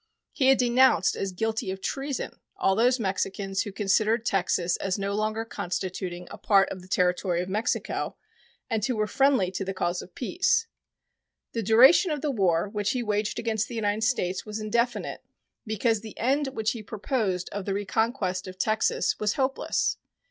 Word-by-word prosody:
He 260 Hz, -, +1 dB
had 270 Hz, 0 st, +6 dB
denounced 250 Hz, -4 st, +4 dB
as 195 Hz, -, -3 dB
guilty 220 Hz, +2 st, -2 dB
of 190 Hz, 0 st, -4 dB
treason 275 Hz, +5 st, -4 dB, 0.2 s
all 195 Hz, -, +2 dB
those 245 Hz, +4 st, +3 dB
Mexicans 195 Hz, -1 st, -1 dB
who 205 Hz, -, -4 dB
considered 215 Hz, +4 st, +1 dB
Texas 180 Hz, -3 st, +1 dB
as 195 Hz, 0 st, -2 dB
no 200 Hz, 0 st, -2 dB
longer 215 Hz, +2 st, -1 dB
constituting 180 Hz, -3 st, -4 dB
a -, -, -9 dB
part 195 Hz, -2 st, +4 dB
of 185 Hz, -, -6 dB
the 180 Hz, -, -14 dB
territory 180 Hz, -1 st, +1 dB
of 180 Hz, +1 st, -3 dB
Mexico 215 Hz, +4 st, -2 dB, 0.5 s
and 225 Hz, -4 st, -1 dB
who 250 Hz, +2 st, 0 dB
were 215 Hz, 0 st, +1 dB
friendly 265 Hz, -6 st, +2 dB
to 190 Hz, -, -3 dB
the 195 Hz, 0 st, -4 dB
cause 175 Hz, -1 st, -1 dB
of 180 Hz, -, -14 dB
peace. 365 Hz, -, +1 dB, 0.9 s
The 230 Hz, -, -2 dB
duration 255 Hz, -, +6 dB
of 300 Hz, -3 st, -2 dB
the 300 Hz, -, 0 dB
war 185 Hz, -6 st, +2 dB
which 205 Hz, 0 st, -1 dB
he 250 Hz, -2 st, -1 dB
waged 210 Hz, -1 st, -1 dB
against 225 Hz, -1 st, -1 dB
the 240 Hz, -, -7 dB
United 215 Hz, -1 st, 0 dB
States 185 Hz, -4 st, 0 dB
was 215 Hz, 0 st, -5 dB
indefinite, 235 Hz, +3 st, -1 dB, 0.4 s
because 220 Hz, 0 st, +1 dB
the 220 Hz, -1 st, -10 dB
end 275 Hz, +4 st, +1 dB
which 220 Hz, -5 st, -1 dB
he 230 Hz, -, -6 dB
proposed 210 Hz, -4 st, -2 dB
of 200 Hz, -1 st, -5 dB
the 195 Hz, -, -1 dB
reconquest 200 Hz, -2 st, -1 dB
of 185 Hz, 0 st, -9 dB
Texas 215 Hz, +3 st, +1 dB
was 210 Hz, -1 st, +1 dB
hopeless. 270 Hz, 0 st, 0 dB
215 Hz, 175 wpm, -27 LUFS, 190-235 Hz, 0.9 s, had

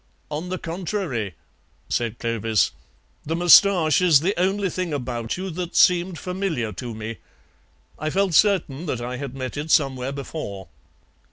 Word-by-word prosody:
"On 155 Hz, +4 st, -4 dB
the 185 Hz, -, -2 dB
contrary," 165 Hz, -, -3 dB, 0.5 s
said 115 Hz, -1 st, -1 dB
Clovis, 115 Hz, -3 st, +1 dB, 0.5 s
"the 160 Hz, -, -2 dB
moustache 175 Hz, -1 st, +6 dB
is 165 Hz, -6 st, +5 dB
the 190 Hz, +5 st, +1 dB
only 195 Hz, +2 st, +1 dB
thing 180 Hz, -2 st, -3 dB
about 120 Hz, -3 st, -3 dB
you 190 Hz, 0 st, -4 dB
that 175 Hz, +1 st, -5 dB
seemed 180 Hz, -1 st, +4 dB
familiar 180 Hz, -, -2 dB
to 115 Hz, +4 st, -6 dB
me. 110 Hz, +1 st, -6 dB, 0.8 s
I 155 Hz, -, -1 dB
felt 190 Hz, +2 st, +1 dB
certain 175 Hz, -4 st, +2 dB
that 125 Hz, -, -2 dB
I 125 Hz, +1 st, -4 dB
had 135 Hz, -1 st, -6 dB
met 130 Hz, +1 st, -5 dB
it 150 Hz, +2 st, -4 dB
somewhere 135 Hz, -4 st, +2 dB
before." 135 Hz, -, -6 dB
155 Hz, 150 wpm, -23 LUFS, 120-180 Hz, 0.8 s, moustache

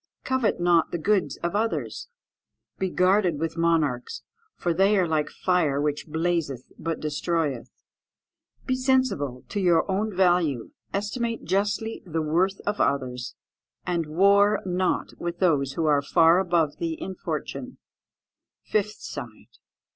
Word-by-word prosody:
"Covet 260 Hz, -7 st, 0 dB
not 175 Hz, -2 st, +3 dB
the -, -, -2 dB
goods 170 Hz, -5 st, +1 dB
of 170 Hz, +3 st, -1 dB
others. 225 Hz, -, -2 dB, 0.7 s
"Be 190 Hz, -, 0 dB
guarded 185 Hz, -2 st, +2 dB
with 165 Hz, 0 st, -2 dB
monarchs, 160 Hz, -7 st, 0 dB, 0.3 s
for 175 Hz, -, -1 dB
they 195 Hz, +4 st, +3 dB
are 185 Hz, -2 st, +2 dB
like 155 Hz, -2 st, 0 dB
fire 165 Hz, -7 st, +1 dB
which 145 Hz, +1 st, -1 dB
blazeth 160 Hz, -5 st, -1 dB, 0.2 s
but 165 Hz, 0 st, -3 dB
destroyeth. 150 Hz, -5 st, -2 dB, 1.0 s
"Be 260 Hz, -, 0 dB
sensible 255 Hz, -, 0 dB
to 205 Hz, -, -2 dB
your 175 Hz, -4 st, +3 dB
own 210 Hz, +3 st, 0 dB
value; 175 Hz, -9 st, +2 dB, 0.2 s
estimate 230 Hz, +3 st, -2 dB
justly 205 Hz, +4 st, -1 dB
the 165 Hz, -3 st, -2 dB
worth 180 Hz, +6 st, +1 dB
of 205 Hz, 0 st, -1 dB
others; 125 Hz, -3 st, -1 dB, 0.5 s
and 170 Hz, -3 st, -1 dB
war 200 Hz, +5 st, +4 dB
not 185 Hz, 0 st, -1 dB
with 170 Hz, 0 st, -4 dB
those 145 Hz, -7 st, +2 dB
who 165 Hz, +2 st, -1 dB
are 145 Hz, -2 st, +3 dB
far 165 Hz, +4 st, +4 dB
above 170 Hz, -5 st, +1 dB
thee 165 Hz, -1 st, -3 dB
in 190 Hz, -, -5 dB
fortune." -, -, -5 dB, 1.0 s
_Fifth 210 Hz, 0 st, 0 dB
side. -, -, -9 dB
170 Hz, 135 wpm, -25 LUFS, 150-195 Hz, 1.0 s, war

